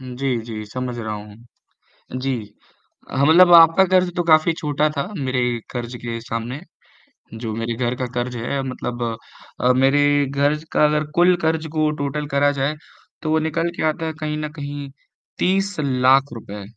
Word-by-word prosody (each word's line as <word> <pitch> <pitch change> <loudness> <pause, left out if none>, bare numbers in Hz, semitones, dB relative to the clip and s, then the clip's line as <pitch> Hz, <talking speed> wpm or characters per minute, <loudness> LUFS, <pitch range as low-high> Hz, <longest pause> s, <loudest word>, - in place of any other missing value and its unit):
हुँ, 130 -1 -8
जी, 135 -1 0
जी 110 -2 -6
समझ 125 +2 -5
रहा 110 -2 -4
हूँ। 105 0 -10 0.8
जी, 135 +1 -1 0.8
हाँ 140 +2 +2
मतलब 175 +3 +7
आपका 165 +3 +8
क़र्ज़ 185 -1 +2
तो 175 - +1
काफ़ी 160 0 +4
छोटा 150 0 +1
था 140 - -1
मेरे 130 -4 -1 0.3
क़र्ज़ 120 0 -5
के 115 -1 -4
सामने, 115 +4 -5 0.7
जो 110 -1 -5
मेरे 115 +1 -2
घर 120 +1 -1
का 130 - -2
क़र्ज़ 120 0 -3
है 120 +4 -2
मतलब 125 -2 -4 0.6
अ, 125 +1 +4
मेरे 145 +2 +3
घर 140 +2 +1 0.2
का, - - +4
अगर 150 0 +1
कुल 180 +1 +5
क़र्ज़ 160 0 0
को 155 -1 +2
टोटल 145 +1 -2
करा 145 +1 +4
जाए। 140 +3 0 0.5
तो 155 - -2
वो 160 - +3
निकल 165 +2 -1
के - - -2
आता 160 +1 -3
है 160 - -3
कहीं 150 0 -2
न 155 0 -3
कहीं 145 -1 -6 0.5
30 195 +2 +1
लाख 135 0 +3
रुपए। 105 -3 -8
140 Hz, 175 wpm, -21 LUFS, 125-155 Hz, 0.8 s, आपका